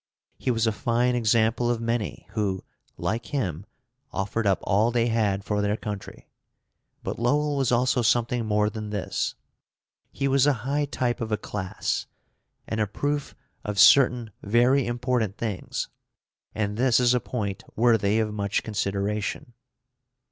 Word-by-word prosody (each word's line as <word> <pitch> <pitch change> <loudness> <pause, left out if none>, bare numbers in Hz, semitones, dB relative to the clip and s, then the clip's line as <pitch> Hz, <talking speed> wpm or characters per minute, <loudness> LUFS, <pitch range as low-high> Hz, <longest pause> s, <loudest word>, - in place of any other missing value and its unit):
He - - -2
was 115 -2 +2
a 110 - +3
fine 120 +2 +1
example 115 0 +2
of 120 -1 0
many 115 -2 -2
who, 100 -4 -1 0.3
like 110 +6 -2
him, 100 - -3 0.4
offered 100 +3 -1
up 95 - +3
all 105 +3 +3
they 120 0 +1
had 105 -4 +1
for 105 0 -1
their 105 +1 0
country. 105 -3 -7 0.8
But - - -4
Lowell 145 +5 +1
was 135 -3 +1
also 125 +1 +2
something 120 +1 +2
more 105 -1 +2
than 105 0 -5
this. 105 -2 -2 0.8
He 140 - -1
was 135 +1 +4
a 145 - +5
high 145 +2 +1
type 125 -4 -2
of 110 -1 -3
a 105 - +2
class, 95 -3 -3 0.6
and 110 - -2
a 105 - +1
proof 145 +6 -2 0.3
of 105 -1 -4
certain 120 +1 +6
very 120 +6 +3
important 120 -3 -1
things, 110 -5 -3 0.7
and 105 -1 -1
this 125 0 +4
is 125 0 +4
a 125 - +3
point 105 -6 -4
worthy 110 -3 +3
of 110 -1 0
much 100 -1 -1
consideration. 105 +2 -2
115 Hz, 150 wpm, -26 LUFS, 105-125 Hz, 0.8 s, certain